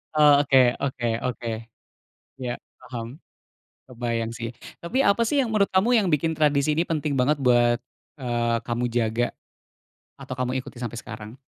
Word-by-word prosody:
Oh, 145 -1 +6
oke 130 -3 +5
oke 130 -3 -1 0.2
oke. 125 -1 -3 1.0
Ya, 120 -1 -3 0.2
paham. 115 -2 -6 0.8
Kebayang, 115 -2 -3
sih. 115 -1 -5 0.3
Tapi, 255 +11 0
apa 200 +3 +3
sih 295 - 0
yang 225 -3 -3
menurut 200 -2 +3
kamu 190 +5 +2
yang 200 - 0
bikin 160 0 +1
tradisi 150 -1 +2
ini 165 +3 0
penting 155 -2 -1
banget 135 +4 +3
buat, 120 -1 +4 0.4
eee, 120 -3 0
kamu 120 0 -2
jaga? 115 0 +1 0.9
Atau 130 - -7
kamu 125 0 -1
ikuti 125 - -12
sampai 120 -1 -4
sekarang? 110 +3 -9
125 Hz, 150 wpm, -25 LUFS, 120-150 Hz, 1.0 s, Oh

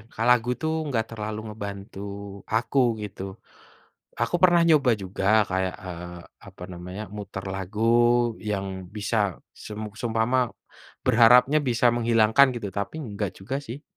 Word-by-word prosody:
ka 110 - -3
lagu 125 -1 +4
itu - - -9 0.2
nggak 115 -5 0
terlalu 110 -1 -4
ngebantu 100 -2 -7 0.5
aku 115 +5 0 0.3
gitu. 95 -2 -8 1.0
Aku 175 - +1
pernah 175 -2 +6
nyoba 145 -6 +5
juga 95 0 -5 0.3
kayak, 95 0 0
eee, 85 0 -7 0.3
apa - - -13
namanya, 90 +4 -7
mutar 100 -1 -6
lagu 95 +2 -5 0.7
yang 100 -1 -1 0.3
bisa 105 +2 -2 0.5
sem 105 - -7 0.2
seumpama 115 +2 +1 0.7
berharapnya 125 +5 +6
bisa 120 0 +2
menghilangkan 115 +2 +5
gitu, 105 -4 -4
tapi 100 +10 -4
enggak 105 -5 -3
juga 115 +8 -3
sih. 125 +6 -7
110 Hz, 130 wpm, -25 LUFS, 100-120 Hz, 1.0 s, pernah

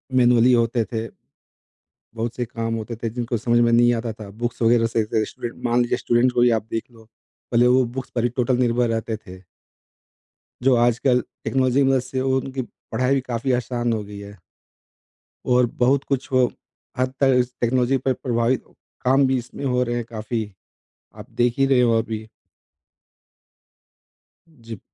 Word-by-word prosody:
Manually 125 -1 +5
होते 115 0 +2
थे। 115 -1 -3 1.1
बहुत 115 +1 -3
से 125 - -1
काम 115 0 -4
होते 115 +1 -5
थे 115 - 0
जिनको 120 +1 -3
समझ 120 +2 +2
में 120 0 +4
नहीं 120 +1 +5
आता 115 0 -3
था, 110 -2 -10
बुक्स 120 +3 -4
वगैरह 115 0 +4
से 115 0 0
से 110 0 0
स्टूडेंट 120 +2 -8
मान 120 +1 +2
लीजिए 120 - 0
स्टूडेंट्स 120 +1 +2
को - - +2
ही 120 - +5
आप 105 - -25
देख 115 - -2
लो 115 -1 -17 0.5
पहले 120 +1 +4
वो 125 +1 +4
बुक्स 130 - -5
पर 120 - 0
ही 120 - +3
टोटल 125 0 +1
निर्भर 120 -1 +2
रहते 115 0 -2
थे। 90 0 -11 1.2
जो 130 -1 +5
आजकल 120 +2 +2 0.2
टेक्नोलॉजी 130 0 +1
की 135 - +3
मदद 135 -1 +3
से 130 +1 -4
उनकी 130 0 -1 0.3
पढ़ाई 125 +4 +1
भी 135 - 0
काफ़ी 120 +3 -1
आसान 120 -1 -2
हो 110 -2 -2
गई 100 0 -10
है। 100 -1 -11 1.1
और 125 0 +4
बहुत 135 +3 +3
कुछ 135 0 -3
वो 130 -1 +4 0.5
हद 130 0 0
तक 135 -1 +4
इस 125 0 -1
टेक्नोलॉजी 125 +2 +2
पे 130 +1 0
प्रभावित, 120 0 0 0.4
काम 135 +2 +3
भी 130 0 +1
इसमें 125 +3 -7
हो 125 -1 +1
रहे 120 -1 -2
हैं 120 -1 -3
काफ़ी, 110 -1 -4 0.6
आप - - -11
देख 120 0 +2
ही 135 - +4
रहे 135 -2 +3
हो 115 -2 +3
अभी। 110 -1 -5 2.2
जी। 115 - -11
120 Hz, 180 wpm, -22 LUFS, 115-130 Hz, 2.2 s, Manually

